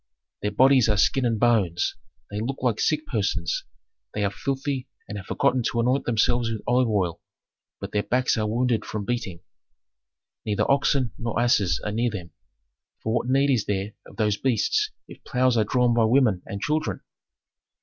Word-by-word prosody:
"Their 105 - 0
bodies 130 +2 +4
are 105 - +2
skin 125 +5 +2
and 115 -2 -1
bones, 105 -8 +2 0.4
they 105 - -3
look 130 +5 -3
like 120 -4 0
sick 155 0 +1
persons, 95 -7 -1 0.5
they 105 - 0
are 100 - 0
filthy 135 +2 -3 0.2
and 105 - -6
have 95 -2 -7
forgotten 130 -2 +1
to 120 - -1
anoint 125 +4 +1
themselves 120 0 +1
with 110 -2 -4
olive 125 0 +2
oil, 95 -6 -1 0.6
but - - -6
their 105 - +1
backs 125 +4 +1
are 110 -2 -1
wounded 120 +1 0
from 105 -2 -5
beating. 100 -7 -3 1.0
"Neither 105 -2 0
oxen 140 -3 +2
nor 115 0 -2
asses 120 -6 +2
are 105 - -1
near 120 +3 0
them, 90 -6 -7 0.7
for 110 - -1
what 120 +1 -1
need 135 +2 +3
is 120 -6 +1
there 100 +1 -2
of - - -15
those 105 -2 +1
beasts 135 - +1 0.2
if - - -13
ploughs 130 -2 +1
are 110 -2 +3
drawn 125 +2 +2
by 115 -1 +3
women 110 -6 +3
and 100 0 -6
children? 150 -9 -1
115 Hz, 180 wpm, -25 LUFS, 105-130 Hz, 1.0 s, bodies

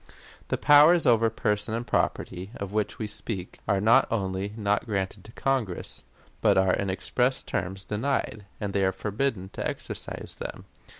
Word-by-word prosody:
"The - - 0
powers 150 +4 +7
over 115 -2 +5
person 105 0 0
and 120 +1 -3
property, 90 -4 -1
of 100 0 -6
which 105 -1 -1
we 110 - -3
speak, 105 -3 -5
are 100 - +2
not 115 +6 +5
only 95 -2 -2
not 105 +1 0
granted 100 -2 -2
to 110 - -11
Congress, 125 -10 -2 0.4
but - - +4
are 95 -1 +4
in 100 - 0
express 125 +7 0
terms 95 +1 -3
denied, 110 -2 -2
and 100 -2 -3
they 100 - +2
are 95 - +3
forbidden 105 0 -2
to - - -3
exercise - - -6
them. - - -6
105 Hz, 165 wpm, -27 LUFS, 95-115 Hz, 0.4 s, powers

